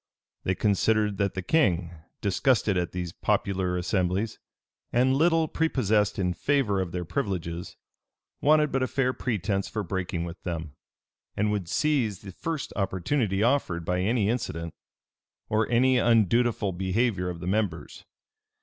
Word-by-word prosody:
They 95 Hz, -, +1 dB
considered 105 Hz, 0 st, +1 dB
that 100 Hz, -1 st, 0 dB
the 95 Hz, -, -3 dB
king, 90 Hz, -, +2 dB, 0.3 s
disgusted 105 Hz, +1 st, +2 dB
at 90 Hz, -1 st, -1 dB
these 90 Hz, -2 st, -4 dB
popular 95 Hz, -2 st, 0 dB
assemblies, 95 Hz, +3 st, -1 dB, 0.5 s
and 130 Hz, +2 st, +3 dB
little 165 Hz, +2 st, +3 dB
prepossessed 110 Hz, -11 st, +1 dB
in 90 Hz, -2 st, 0 dB
favor 120 Hz, -6 st, +1 dB
of 90 Hz, -2 st, -4 dB
their 90 Hz, 0 st, -3 dB
privileges, 85 Hz, -1 st, -3 dB, 0.6 s
wanted 150 Hz, 0 st, +4 dB
but 135 Hz, -, 0 dB
a 130 Hz, -, +1 dB
fair 130 Hz, -1 st, 0 dB
pretence 100 Hz, -6 st, -1 dB
for 105 Hz, -, -3 dB
breaking 90 Hz, -2 st, -3 dB
with 85 Hz, +1 st, -7 dB
them, 80 Hz, -4 st, -5 dB, 0.6 s
and 105 Hz, +1 st, +1 dB
would 100 Hz, -5 st, -2 dB
seize 125 Hz, -, +1 dB
the 100 Hz, -, -8 dB
first 155 Hz, -, -4 dB
opportunity 95 Hz, +2 st, 0 dB
offered 115 Hz, -10 st, +1 dB
by 90 Hz, +1 st, 0 dB
any 105 Hz, +1 st, +1 dB
incident, 85 Hz, -8 st, -2 dB, 0.8 s
or 110 Hz, 0 st, +1 dB
any 125 Hz, +2 st, +4 dB
undutiful 115 Hz, -2 st, +3 dB
behavior 95 Hz, +1 st, 0 dB
of 85 Hz, -1 st, -6 dB
the 85 Hz, -, -6 dB
members. 90 Hz, -6 st, -2 dB
100 Hz, 140 wpm, -27 LUFS, 90-120 Hz, 0.8 s, wanted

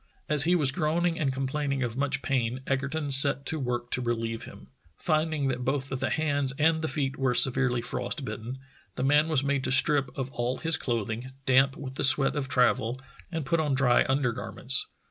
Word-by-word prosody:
As 150 Hz, -1 st, +5 dB
he 175 Hz, +2 st, +3 dB
was 145 Hz, -6 st, +1 dB
groaning 165 Hz, +3 st, -1 dB
and 140 Hz, -4 st, 0 dB
complaining 135 Hz, +1 st, -2 dB
of 120 Hz, -2 st, -4 dB
much 140 Hz, 0 st, -2 dB
pain, 130 Hz, -2 st, -1 dB
Egerton 140 Hz, +2 st, -2 dB
set 140 Hz, +1 st, +6 dB
to 160 Hz, -, -3 dB
work 120 Hz, -2 st, -3 dB
to 125 Hz, -, 0 dB
relieve 115 Hz, -1 st, -3 dB
him. -, -, -14 dB, 0.3 s
Finding 155 Hz, -3 st, 0 dB
that 125 Hz, -1 st, -3 dB
both 135 Hz, +1 st, -2 dB
the 135 Hz, -1 st, -2 dB
hands 145 Hz, -4 st, 0 dB
and 160 Hz, +1 st, +2 dB
the 160 Hz, -, -2 dB
feet 135 Hz, -3 st, -3 dB
were 130 Hz, -2 st, +1 dB
severely 125 Hz, -1 st, +3 dB
frost 140 Hz, -, -3 dB
bitten, 115 Hz, +3 st, -6 dB, 0.4 s
the -, -, -3 dB
man 145 Hz, +3 st, +3 dB
was 150 Hz, -4 st, +1 dB
made 140 Hz, -1 st, -1 dB
to -, -, -2 dB
strip 140 Hz, +1 st, +4 dB
off 135 Hz, -1 st, -4 dB
all 120 Hz, +2 st, -2 dB
his 165 Hz, 0 st, +2 dB
clothing, 115 Hz, +1 st, -3 dB, 0.2 s
damp 135 Hz, +1 st, +3 dB
with 135 Hz, -1 st, -8 dB
the -, -, -2 dB
sweat 135 Hz, +1 st, +5 dB
of 145 Hz, -2 st, -2 dB
travel, 125 Hz, -1 st, +1 dB, 0.3 s
and 165 Hz, -4 st, -4 dB
put 165 Hz, +4 st, 0 dB
on 150 Hz, -3 st, 0 dB
dry 130 Hz, -2 st, +3 dB
undergarments. 130 Hz, 0 st, -1 dB
135 Hz, 195 wpm, -27 LUFS, 125-150 Hz, 0.4 s, set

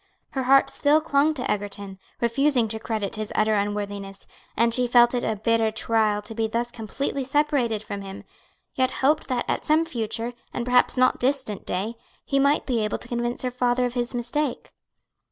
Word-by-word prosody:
Her 265 Hz, -2 st, -2 dB
heart 270 Hz, +1 st, +5 dB
still 295 Hz, +2 st, +3 dB
clung 305 Hz, 0 st, +2 dB
to 255 Hz, -, -3 dB
Egerton, 200 Hz, -1 st, -3 dB, 0.2 s
refusing 245 Hz, +1 st, +2 dB
to 220 Hz, +1 st, -3 dB
credit 215 Hz, -2 st, -3 dB
his 215 Hz, -1 st, -4 dB
utter 215 Hz, 0 st, +2 dB
unworthiness, 205 Hz, -1 st, -3 dB, 0.3 s
and 230 Hz, 0 st, +3 dB
she 250 Hz, +1 st, +2 dB
felt 240 Hz, 0 st, +5 dB
it 245 Hz, -, -1 dB
a 220 Hz, -, 0 dB
bitter 225 Hz, +1 st, +1 dB
trial 215 Hz, -1 st, 0 dB
to 215 Hz, -, -5 dB
be 225 Hz, 0 st, -1 dB
thus 235 Hz, +2 st, -2 dB
completely 265 Hz, +5 st, -3 dB
separated 265 Hz, -6 st, +1 dB
from 200 Hz, -2 st, -6 dB
him, 195 Hz, 0 st, -8 dB, 0.5 s
yet 260 Hz, -1 st, +1 dB, 0.2 s
hoped 300 Hz, +2 st, +3 dB
that 250 Hz, -3 st, -1 dB
at -, -, -1 dB
some 315 Hz, +2 st, +3 dB
future, 230 Hz, -4 st, -3 dB, 0.2 s
and 240 Hz, -, -2 dB
perhaps 250 Hz, +1 st, +3 dB
not 255 Hz, 0 st, +3 dB
distant 260 Hz, -6 st, -1 dB
day, 210 Hz, +6 st, -3 dB, 0.3 s
he 275 Hz, -, +1 dB
might 280 Hz, +2 st, +3 dB
be 235 Hz, -5 st, 0 dB
able 210 Hz, -, -1 dB
to -, -, -10 dB
convince 240 Hz, +1 st, -3 dB
her 250 Hz, -, -1 dB
father 250 Hz, 0 st, +1 dB
of 245 Hz, -, -3 dB
his 245 Hz, 0 st, -2 dB
mistake. 250 Hz, +3 st, -2 dB
240 Hz, 190 wpm, -24 LUFS, 215-260 Hz, 0.5 s, heart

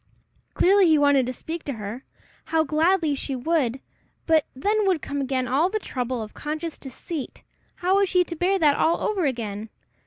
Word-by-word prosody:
Clearly 390 Hz, 0 st, +5 dB
he 315 Hz, -1 st, +5 dB
wanted 285 Hz, -3 st, +4 dB
to -, -, -1 dB
speak 320 Hz, +6 st, -6 dB
to 280 Hz, -, -3 dB
her! 220 Hz, +3 st, -7 dB, 0.4 s
How 320 Hz, -1 st, +2 dB
gladly 320 Hz, +1 st, +2 dB
she 275 Hz, 0 st, -3 dB
would! 265 Hz, -2 st, 0 dB, 0.5 s
but 320 Hz, -2 st, +3 dB
then 415 Hz, +9 st, +1 dB
would 365 Hz, -4 st, +2 dB
come 285 Hz, -1 st, -4 dB
again 260 Hz, -1 st, -1 dB
all 285 Hz, +8 st, +2 dB
the 435 Hz, -, -1 dB
trouble 255 Hz, -, -3 dB
of 215 Hz, -, -10 dB
conscious 310 Hz, +2 st, -5 dB
deceit: 280 Hz, +3 st, -7 dB, 0.3 s
how 370 Hz, +2 st, +1 dB
was 400 Hz, -2 st, +2 dB
she 365 Hz, -1 st, +4 dB
to 340 Hz, -, -7 dB
bear 365 Hz, +4 st, +1 dB
that 300 Hz, -5 st, +4 dB
all 330 Hz, -, +2 dB
over 390 Hz, -6 st, 0 dB
again! 220 Hz, -5 st, -3 dB
305 Hz, 185 wpm, -24 LUFS, 260-355 Hz, 0.5 s, Clearly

